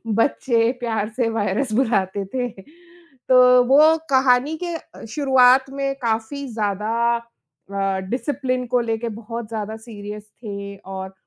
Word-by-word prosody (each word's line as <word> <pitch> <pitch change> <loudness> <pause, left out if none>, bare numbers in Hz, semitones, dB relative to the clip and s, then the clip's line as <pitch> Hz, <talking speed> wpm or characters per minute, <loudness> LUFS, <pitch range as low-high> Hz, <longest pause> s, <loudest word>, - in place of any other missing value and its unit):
बच्चे 230 -1 +2
प्यार 220 -3 -2
से 240 - +2
वायरस 225 +3 -1
बुलाते 200 -5 +1
थे। 250 -2 -1 0.8
तो 250 -1 +7
वो 310 +4 +6
कहानी 265 +2 +3
के 345 -1 -3
अ, 325 - -11
शुरुआत 265 -1 +4
में 275 0 -2
काफ़ी 230 +5 -2
ज़्यादा 210 0 -1 0.2
अ, 195 -4 -5
डिसिप्लिन 255 -1 -2
को 250 - +3
लेके 230 0 -2
बहुत 230 +1 -6
ज़्यादा 220 -1 -4
सीरियस 210 -2 -9
थे 200 -1 -6
और 190 0 -8
230 Hz, 130 wpm, -22 LUFS, 210-260 Hz, 0.8 s, तो